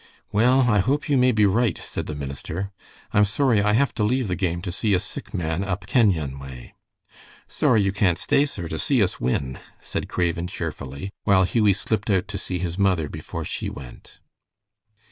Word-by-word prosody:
"Well, 125 +5 +4
I 115 -5 +3
hope 140 +10 0
you 145 - +3
may 125 -1 +4
be 110 -3 +3
right," 100 0 +2
said - - -5
the 75 - -4
minister. 75 +7 -5 0.4
"I 105 - +4
am 105 - +6
sorry 110 +1 +2
I 105 +1 +2
have 130 +3 +2
to 105 - -1
leave 125 0 +1
the 90 - 0
game 85 -2 -1
to 90 - -3
see 100 +2 +1
a - - +2
sick 100 - -8
man 85 -1 -2
up 95 -1 -3
Kenyon 80 - +2
way." 65 -2 -10 0.7
"Sorry 105 - +2
you 100 - +1
can't 95 -3 +2
stay, 140 - +3
sir, 90 - -5
to 80 - -4
see 130 -6 +2
us 90 - -2
win," 65 +1 -1 0.2
said - - -5
Craven, 85 -1 -1
cheerfully, 70 +1 -6
while 95 -2 +5
Hughie 105 +1 +3
slipped 105 +2 -2
out 95 -2 +2
to 100 -1 -4
see 90 - -3
his 90 +1 -3
mother 90 -6 +2
before - - -6
she - - -4
went. 65 -4 -11
100 Hz, 200 wpm, -24 LUFS, 85-110 Hz, 0.7 s, am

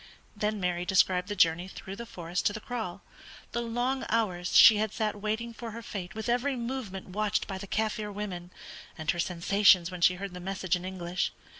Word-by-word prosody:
Then 210 0 -1
Mary 180 -1 0
described 180 -1 +3
the 205 - -3
journey 170 0 +3
through 190 0 -8
the 235 +3 -7
forest 175 -2 -2
to 205 - 0
the 215 - -5
kraal, 215 -5 -5 0.5
the 235 - -1
long 245 +3 -1
hours 185 -6 +1
she 220 - +10
had 215 -1 0
sat 215 -2 -1
waiting 220 +2 -2
for 230 0 -7
her 230 +1 -8
fate 195 -1 -6
with 220 +1 -4
every 250 +3 +1
movement 235 -6 -5
watched 210 +2 0
by 190 -1 -5
the 200 - -7
Kaffir 215 0 -1
women, 190 -4 -5 0.5
and 155 -1 0
her 175 - -5
sensations 180 +1 +4
when 180 -1 -7
she 180 +1 +5
heard 195 0 -6
the 180 - -7
message 185 -1 -1
in 180 0 -5
English. 180 -1 -2
200 Hz, 200 wpm, -29 LUFS, 180-220 Hz, 0.5 s, she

